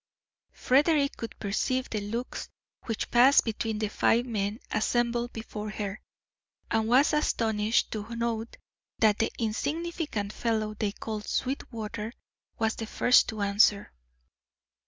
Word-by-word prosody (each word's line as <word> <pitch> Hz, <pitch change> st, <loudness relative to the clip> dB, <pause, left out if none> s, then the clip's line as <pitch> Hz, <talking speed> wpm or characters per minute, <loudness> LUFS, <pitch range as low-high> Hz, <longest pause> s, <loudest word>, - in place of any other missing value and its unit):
Frederick 285 Hz, +2 st, +3 dB
could 230 Hz, -, -7 dB
perceive 255 Hz, +5 st, -1 dB
the 215 Hz, -, -1 dB
looks 230 Hz, +5 st, -4 dB, 0.4 s
which 225 Hz, -2 st, -3 dB
passed 255 Hz, +4 st, +6 dB
between 220 Hz, -1 st, -2 dB
the 215 Hz, 0 st, -1 dB
five 230 Hz, +3 st, +2 dB
men 210 Hz, -2 st, -2 dB
assembled 240 Hz, +1 st, 0 dB
before 215 Hz, -1 st, -6 dB
her, 210 Hz, 0 st, -5 dB, 0.7 s
and 220 Hz, -1 st, +1 dB
was 260 Hz, +6 st, +4 dB
astonished 220 Hz, -7 st, +1 dB
to 220 Hz, +2 st, -5 dB
note 230 Hz, -1 st, -3 dB, 0.4 s
that 215 Hz, -2 st, +3 dB
the 225 Hz, -, +1 dB
insignificant 270 Hz, -, -2 dB
fellow 220 Hz, -2 st, -1 dB
they 210 Hz, -1 st, -1 dB
called 210 Hz, 0 st, -6 dB
Sweetwater 230 Hz, -4 st, -3 dB, 0.4 s
was 220 Hz, 0 st, 0 dB
the 225 Hz, -, -4 dB
first 245 Hz, +3 st, +4 dB
to 220 Hz, -3 st, -4 dB
answer. 200 Hz, 0 st, +3 dB
225 Hz, 125 wpm, -28 LUFS, 215-240 Hz, 0.7 s, passed